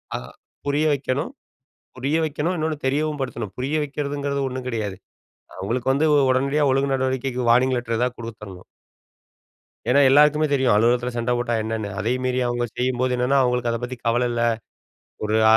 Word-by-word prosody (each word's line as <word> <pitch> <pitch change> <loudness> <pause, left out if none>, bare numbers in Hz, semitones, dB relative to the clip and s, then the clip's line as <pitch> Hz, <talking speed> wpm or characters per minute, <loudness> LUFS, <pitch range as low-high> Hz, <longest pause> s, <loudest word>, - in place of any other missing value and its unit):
அ - - 0 0.5
புரிய 145 +2 +1
வைக்கணும் 140 - -2 0.7
புரிய 140 +5 0
வைக்கணும், 155 +4 -1
இன்னொன்னு 155 -1 -1
தெரியவும் 150 +2 0
படுத்தணும். 115 -6 -4
புரிய 135 +4 -2
வைக்கிறதுங்கிறது 140 -1 -3
ஒண்ணும் 130 0 -5
கிடையாது. 105 -6 -3 0.6
அவுங்களுக்கு 120 +7 -1
வந்து 150 +4 +2 0.2
உடனடியா 140 +3 +2
ஒழுங்கு 135 +1 +1
நடவடிக்கைக்கு 130 -1 -1
வார்னிங் 125 +2 +4
லெட்ரு 115 -1 -2
எதாவது 125 0 -1
கொடுத்துர்ணும். 105 -5 -9 1.2
ஏனா 125 +4 +4
எல்லாருக்குமே 150 +2 +5
தெரியும். 130 -3 +3
அலுவலகத்தில 120 +3 +2
சண்ட 120 +1 0
போட்டா 120 0 -1
என்னன்னு. 110 -1 -3
அதையும் 125 +5 -1
மீறி 130 0 0
அவுங்க 120 0 -1
செய்யும்போது 125 0 0
என்னன்னா, 125 +3 +2
அவுங்களுக்கு 125 -1 +1
அத 115 - -1
பத்தி 125 +1 -4
கவல 120 +1 +2
இல்ல. 120 - -1 0.9
ஒரு 110 +1 +1
அசட் 110 - +7
ஒரு - - +8
130 Hz, 160 wpm, -23 LUFS, 120-140 Hz, 1.2 s, ஒரு